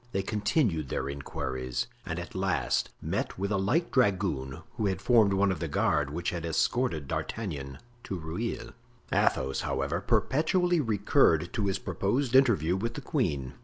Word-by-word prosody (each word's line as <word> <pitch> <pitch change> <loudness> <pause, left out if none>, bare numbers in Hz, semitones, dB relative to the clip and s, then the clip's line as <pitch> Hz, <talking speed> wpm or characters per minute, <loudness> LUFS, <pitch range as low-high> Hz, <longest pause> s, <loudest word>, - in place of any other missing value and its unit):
They 95 - 0
continued 100 - 0
their - - -2
inquiries 65 -3 -3 0.2
and - - -3
at - - -6
last - - 0
met - - -2
with 100 +2 -2
a 100 - +2
light 125 - +1
dragoon 95 - +1
who 105 - -1
had 95 -2 -1
formed 110 -2 +4
one 100 0 +3
of 90 - -3
the - - -2
guard 75 -2 +1
which 85 +4 -2
had 85 -2 -4
escorted 85 - 0
D'Artagnan 70 -13 -4 0.3
to 95 - -3
Rueil. 110 +8 -4 0.4
Athos, 65 +1 +1
however, 70 +6 -1
perpetually 160 - +2
recurred 100 - +3
to 105 -4 0
his 95 0 0
proposed 125 +8 -1
interview 100 - +4
with 115 +5 -3
the 145 - -5
queen. 80 - -1
95 Hz, 160 wpm, -29 LUFS, 75-115 Hz, 0.4 s, formed